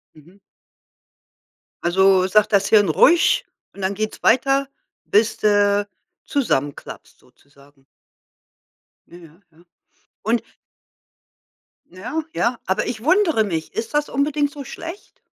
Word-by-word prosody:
Mhm. 165 +6 -19 1.5
Also 190 +1 +3
sagt 210 +2 +2
das 200 -1 +3
Hirn: 205 -3 +5
„Ruhig!“, 320 - +4 0.3
und 200 - -11
dann 190 +1 -1
geht's 215 +2 -5
weiter, 270 +3 +2 0.3
bis 215 +2 +1
du 205 -1 +2 0.4
zusammenklappst 145 - -3
sozusagen. 140 +1 -25 1.2
Ja, 175 - -14
ja, 165 -1 -17
ja. 165 +2 -23 0.6
Und 230 +2 0 1.5
Ja, 235 - -5
ja, 235 +1 0
aber 190 +3 -1
ich 220 -2 -5
wundere 325 - +3
mich, 165 -5 -4
ist 225 +4 -5
das 295 0 0
unbedingt 290 +1 0
so 285 -1 -8
schlecht? 335 +8 -10
210 Hz, 115 wpm, -20 LUFS, 180-275 Hz, 1.5 s, Hirn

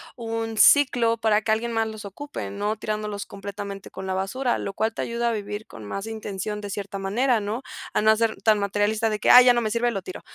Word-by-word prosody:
un 225 -1 -4
ciclo 235 -1 +5
para 220 -1 +2
que 220 - -1
alguien 230 +2 0
más 225 0 +1
los 215 -1 -8
ocupe, 285 +9 -6
no 205 +2 -2
tirándolos 210 -1 -4
completamente 200 0 -7
con 190 0 -7
la 190 - -1
basura, 235 +7 -1
lo 195 - -4
cual 220 +2 -1
te - - -4
ayuda 235 0 -1
a - - 0
vivir 210 0 -5
con 110 - -11
más 195 - -5
intención 210 -1 -5
de 205 - -6
cierta 200 0 -5
manera, 230 +5 +1
¿no? 215 +6 -4 0.3
A - - +2
no 220 +1 +5
ser 225 0 -1
tan 215 -2 +4
materialista 205 +2 0
de 215 - -2
que, - - +1
"Ay, 250 - +10
ya 250 - +8
no 240 - +2
me 215 -2 -2
sirve, 240 +1 +1
lo 195 - -3
tiro", 185 - -8
215 Hz, 240 wpm, -24 LUFS, 200-230 Hz, 0.3 s, Ay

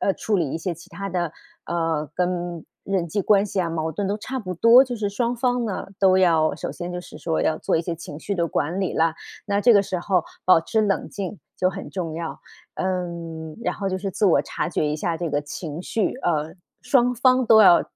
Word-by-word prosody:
呃， 195 - +2
处 210 -2 0
理 160 -6 0
一 - - -2
些 170 +2 -3
其 170 +3 -12
它 195 +3 -6
的 175 -3 -1 0.4
呃， 165 -3 -1
跟 175 -2 -2 0.2
人 190 -3 -1
际 200 +4 -1
关 205 +1 +4
系 195 -1 -1
啊， 170 - -1
矛 160 -1 -2
盾 200 +4 -2
都 205 +2 -1
差 260 +5 -5
不 185 -4 -5
多， 230 +8 +7
就 250 -2 -4
是 210 -2 -1
双 235 +4 -1
方 245 0 +1
呢， 210 -4 -3
都 190 -1 +5
要 165 -4 +4
首 - - -5
先 175 0 -6
就 180 - -4
是 - - -12
说 160 -2 -1
要 155 - +1
做 - - 0
一 160 - +2
些 170 0 -3
情 160 -2 -9
绪 200 - -3
的 170 -3 +1
管 170 +8 -1
理 190 - -1
啦， 165 0 +2 0.3
那 200 -1 +1
这 240 +2 +6
个 200 - +6
时 190 -1 -3
候 180 -2 +1 0.2
保 180 -3 +6
持 220 +6 0
冷 200 -2 0
静 200 0 -5 0.2
就 185 - +2
很 195 +1 -7
重 170 -4 -4
要。 165 0 -5 0.3
嗯， 170 -4 -4
然 - - 0
后 195 - -2
就 185 - -1
是 195 +1 -3
自 205 - +1
我 155 -6 +4
察 170 - -3
觉 165 - -1
一 150 0 0
下 165 +1 -1
这 170 -2 -3
个 145 - +1
情 150 +2 -6
绪， 220 +5 -1
呃， 160 - -1 0.3
双 250 -2 +3
方 255 +1 +3
都 220 -1 +8
要 175 -3 +8
180 Hz, 255 characters per minute, -23 LUFS, 165-205 Hz, 0.4 s, 都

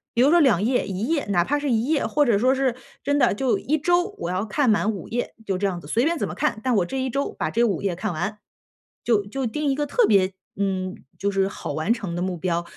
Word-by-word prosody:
比 235 - +3
如 270 - +6
说 345 +3 +5
2 245 - +4
页 245 +3 +1
1 195 +3 -3
页， 315 -3 0
哪 175 -3 +3
怕 290 +11 0
是 290 -2 -1
1 225 0 +2
页， 305 -2 +1
或 295 - +2
者 235 -7 +3
说 255 +5 +3
是， 265 -3 0 0.3
真 285 0 +1
的 245 -4 +4
就 250 +4 +1
1 305 +3 -1
周 350 +6 +1
我 - - -3
要 185 +3 -1
看 250 +5 +1
满 215 0 +2
5 195 -5 -7
页， 245 +2 -3
就 195 -3 -1
这 200 - -1
样 180 -3 -2
子， 145 - -12
随 230 +9 +1
便 335 0 0
怎 - - -1
么 - - -6
看， 300 -8 -1
但 255 -2 +2
我 190 -4 +2
这 265 +9 -3
1 260 - -1
周 275 +3 -1
把 - - -2
这 235 - +1
5 205 -7 +1
页 195 -3 -1
看 175 - -3
完。 210 +6 -3 0.7
就 215 -4 +2
就 260 +5 -3
定 290 +5 -1
一 - - +2
个 290 +1 -1
特 480 - +3
别， 190 - +3 0.2
嗯， 190 -1 -2 0.2
就 200 - -1
是 195 -1 +1
好 195 - -5
完 155 +8 -1
成 215 -7 -1
的 175 - -2
目 185 -1 -2
标， 170 0 -1
225 Hz, 265 characters per minute, -24 LUFS, 195-275 Hz, 0.7 s, 如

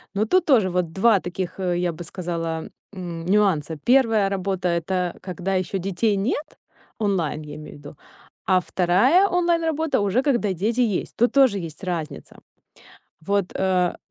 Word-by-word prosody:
Но 210 - +1
тут 360 +10 +2
тоже 235 - +4
вот 180 -2 -1
2 205 +1 +4
таких, 180 +1 -5
э, 180 -2 0
я 175 -1 0
бы 175 - -8
сказала, 165 -2 -4 0.2
м, 175 -3 -6
нюанса. 180 -6 +1
1 230 -6 +4
работа- 190 -1 -2
это 175 +1 -1
когда 185 +1 -4
ещё 185 +1 -1
детей 195 +3 0
нет, 265 +9 -3 0.4
онлайн, 180 -8 -1
я 150 0 -9
имею 155 0 -10
в - - -16
виду, 145 +1 -11 0.5
а 185 -1 +4
2 220 - +3
онлайн-работа- 330 -5 +1
уже 205 +6 +1
когда 240 -9 +1
дети 220 +8 0
есть. 215 -6 -1
Тут 240 +2 +2
тоже 260 -8 +4
есть 165 +2 -8
разница. 170 -5 -5 0.9
Вот, 200 -1 0
а. 185 -2 +1
190 Hz, 155 wpm, -23 LUFS, 175-225 Hz, 0.9 s, тоже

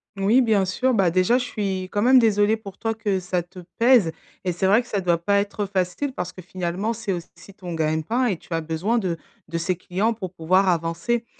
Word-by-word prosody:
Moui, 210 +7 +3
bien 215 -5 +3
sûr. 255 +7 0
Bah, 185 -4 +3
déjà, 185 +7 +3
je 250 - -1
suis, 195 -6 -3
quand 205 - 0
même, 255 +3 +6
désolée 215 -1 +3
pour 200 -3 -11
toi 225 0 -1
que 205 -4 -1
ça 180 -1 -2
te 180 +1 -13 0.2
pèse. 230 -8 +5 0.3
Et 180 - 0
c'est 175 +3 -2
vrai 210 +5 +5
que 240 - -15
ça 200 -4 -1
doit 170 -2 +1
pas 200 +1 +3
être 205 0 -2
facile, 195 +8 -2
parce 180 -4 -4
que, 185 - -10
finalement, 185 +5 -3
c'est 215 -3 -4
aussi 175 +2 -9
ton 180 -4 -7
gagne 155 0 0
pain 245 +8 0
et 195 -8 0
tu 165 - -10
as 165 - 0
besoin 165 +9 -1
de 180 -6 -1 0.3
de 165 +1 -3
ces 175 +2 -1
clients 195 +6 -1
pour 185 -5 -6
pouvoir 185 +3 +2
avancer. 170 +8 -1
190 Hz, 230 wpm, -23 LUFS, 175-220 Hz, 0.3 s, même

